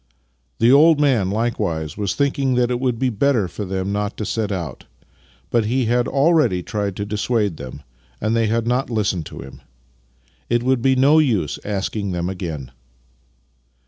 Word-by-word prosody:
" 65 -1 -45
The 115 +2 +4
old 150 +2 +6
man 125 -10 +2
likewise 85 -8 -2
was 100 -3 -2
thinking 140 -2 +1
that 125 0 +2
it 120 - -1
would 125 -2 0
be 130 +1 0
better 115 -2 +1
for 105 +3 -6
them 95 +1 -3
not 105 +1 -2
to 105 - -3
set 110 -1 -2
out, 85 -9 -5 0.7
but 115 -2 +2
he 125 +3 0
had 120 +2 +1
already 140 - +2
tried 100 -1 -3
to 100 - -3
dissuade 105 -3 -1
them, 70 +1 -9 0.4
and 110 +2 0
they 115 -1 +2
had 115 +1 0
not 125 +3 0
listened 105 -8 -1
to - - -9
him. 65 - -12 0.9
It 120 0 +1
would 130 -1 +1
be 130 +2 +3
no 140 +4 +5
use 110 - 0
asking 100 -1 -3
them 90 0 -2
again. 80 -9 -5
110 Hz, 175 wpm, -21 LUFS, 95-125 Hz, 0.9 s, old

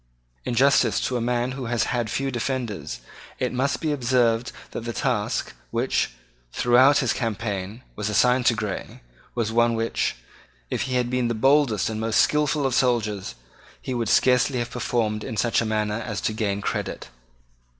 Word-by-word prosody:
In 120 - -2
justice 135 +3 +4
to 130 - -1
a 120 - 0
man 120 +1 0
who 130 -1 -5
has 120 0 0
had 120 -3 -1
few 135 +3 -1
defenders, 110 - -3 0.4
it 125 -1 -1
must 135 +3 0
be 155 - 0
observed 120 -3 +1 0.2
that - - -5
the 115 +1 -5
task, - - -1 0.2
which, - - 0 0.4
throughout 125 - +5
this - - +1
campaign, 105 -1 -3
was 105 0 -2
assigned 125 +3 +3
to 120 - +4
Grey, 105 -3 -5 0.3
was 115 -2 -1
one 115 0 +3
which, 115 - -1 0.6
if - - -1
he 130 - -1
had 125 -1 0
been 125 -1 +1
the 120 - -1
boldest 135 -3 +3
and 110 0 -3
most 110 0 +1
skilful 150 -1 +2
of 135 - +1
soldiers, 110 -6 0 0.4
he 130 - -5
would 115 -3 -1
scarcely 125 +1 +3
have 120 -1 -3
performed 110 -3 -1
in 115 -4 -5
such 120 +1 +2
a - - -1
manner 105 0 -1
as 110 -4 -4
to 110 - -1
gain 100 -2 -1
credit. - - -4
120 Hz, 175 wpm, -24 LUFS, 110-125 Hz, 0.6 s, throughout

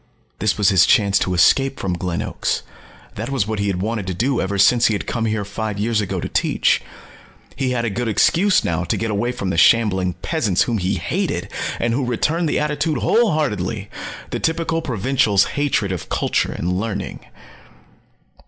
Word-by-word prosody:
This 110 -2 +1
was 105 -1 +4
his 95 -4 +5
chance 100 -2 +4
to 90 - -1
escape 135 +10 +3
from 95 -2 -2
Glen 90 -1 -2
Oaks. - - -2 0.5
That 110 +4 -5
was 135 -7 0
what 110 0 -3
he 100 - 0
had 95 -1 -1
wanted 110 -3 -3
to 95 - -3
do 125 +6 0
ever 100 +1 -2
since 120 +4 +5
he 110 - +1
had - - -4
come 115 -2 -2
here 110 -2 -1
five 105 +1 -4
years 110 +1 0
ago 100 - -3
to - - -3
teach. - - +1 0.7
He 135 -1 -1
had 120 -2 -1
a 110 - -1
good 120 +4 -2
excuse 180 - +3
now 85 +1 -1
to - - -1
get 115 -1 -2
away 105 +4 0
from 95 -6 -3
the 85 - -2
shambling 95 -6 +3
peasants 125 - +1
whom 115 -3 -1
he 95 +2 0
hated - - -2 0.3
and 115 0 0
who 135 +3 0
returned 150 +7 0
the - - +1
attitude 150 0 -1
wholeheartedly 115 - 0 0.4
the - - -2
typical 165 0 -1
provincial's 125 -5 +2
hatred 140 -9 0
of 90 - -5
culture - - 0
and 90 +2 -2
learning. 100 -2 -4
110 Hz, 190 wpm, -20 LUFS, 100-130 Hz, 0.7 s, his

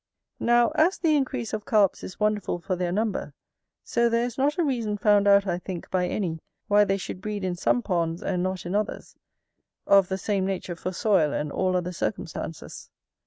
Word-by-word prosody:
Now, 240 0 +4
as 345 +5 +2
the 315 -3 +2
increase 265 -5 -2
of 215 -1 -3
Carps 210 -6 +2
is 185 - -8
wonderful 210 -4 0
for 185 +2 -3
their 180 -1 -2
number, 200 -7 -2 0.5
so 235 0 +1
there 230 +1 +1
is 245 -2 -5
not 285 +2 +1
a 345 - +2
reason 230 -8 -1
found 205 0 +3
out, 200 0 +6
I 175 -2 -1
think, 180 -1 -7
by 180 -1 +1
any, 170 -6 -2 0.3
why 205 0 +5
they 195 0 +1
should 185 -1 -6
breed 210 -1 -4
in 185 -1 -1
some 240 +7 +1
ponds, 170 -3 -1
and 180 - -1
not 185 -1 -3
in 175 - -3
others, 210 +1 -3 0.7
of 195 -2 +5
the 190 - -2
same 195 -1 -1
nature 190 -2 -3
for 185 +2 -4
soil 185 -5 +2
and 150 -1 -2
all 185 +3 0
other 180 0 -3
circumstances. 165 -3 -5
195 Hz, 200 wpm, -26 LUFS, 180-215 Hz, 0.7 s, out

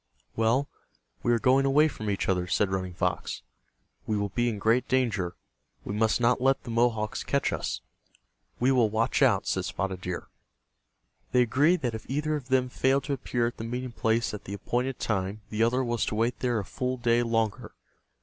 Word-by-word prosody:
"Well, 115 +5 +2 0.5
we 120 - +1
are 120 - +4
going 130 +3 +4
away 145 +3 +4
from 110 -8 -5
each 100 - -1
other," 90 -2 +1
said 95 +2 +1
Running 95 -2 -3
Fox. - - -2 0.6
"We 110 - 0
will 100 0 -1
be 120 +4 0
in 110 - -3
great 110 +5 +2
danger. 115 -9 0 0.5
We - - -4
must 110 +2 +2
not 120 +1 +2
let 135 +1 +2
the 120 - -6
Mohawks 115 -2 +1
catch - - 0
us." - - -3 0.8
"We 125 +2 +3
will 120 -4 +4
watch 115 +6 0
out," 110 -8 +4
said 95 - 0
Spotted 95 -2 -3
Deer. 90 -1 -4 1.1
They 125 -1 +6
agreed 150 +9 +3
that 120 -3 -1
if 110 -1 -7
either 150 +3 0
of 140 -4 -6
them 130 -1 +2
failed 130 +2 +1
to 140 - -2
appear 120 -2 -1
at 120 - -3
the - - -6
meeting 125 +2 -4
place 115 0 0
at 105 - -7
the 100 - -5
appointed 125 +5 -2
time 100 0 -2
the 105 +1 -1
other 125 +3 +3
was 120 -2 -1
to - - -2
wait 115 +3 0
there 125 -2 0
a 100 - -2
full 130 +5 -3
day 120 -1 +2
longer. 115 -3 -1
120 Hz, 200 wpm, -28 LUFS, 105-130 Hz, 1.1 s, They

